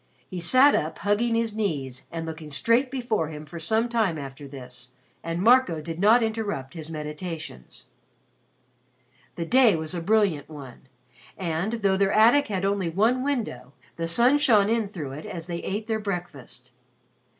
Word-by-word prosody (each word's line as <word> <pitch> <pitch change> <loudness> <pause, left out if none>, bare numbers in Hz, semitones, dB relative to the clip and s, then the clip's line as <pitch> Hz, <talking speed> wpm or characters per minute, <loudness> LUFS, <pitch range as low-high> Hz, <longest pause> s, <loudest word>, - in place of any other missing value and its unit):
He 185 - -6
sat 255 +11 +6
up 155 +1 -1
hugging 220 +3 +1
his 230 -2 0
knees 140 - -3
and 165 -1 -5
looking 160 -1 -7
straight 230 - +2
before 240 - -1
him 150 -1 -8
for 165 +3 -9
some 220 +8 +1
time 220 -8 0
after 140 0 -8
this, 125 -2 -10 0.3
and 165 +1 -3
Marco 235 -8 +4
did 165 +2 -6
not 220 +5 +5
interrupt 205 -12 -3
his 160 -2 -8
meditations. 155 - -7 1.5
The 170 - -3
day 240 0 +5
was 160 0 -3
a 175 - -3
brilliant 195 -6 +1
one, 135 -4 -11 0.5
and, 175 +4 -2
though 190 -1 +3
their 195 0 +2
attic 235 +7 +5
had 195 -3 -2
only 195 -3 0
one 225 +9 +1
window, 225 - -3 0.2
the 165 0 -3
sun 245 +11 +4
shone 215 -7 +4
in 225 -2 +1
through 160 -9 -7
it 145 +3 -8
as 165 -2 -6
they 170 -1 -4
ate 205 +5 -4
their 220 -1 -1
breakfast. 175 - -7
180 Hz, 165 wpm, -25 LUFS, 155-220 Hz, 1.5 s, sat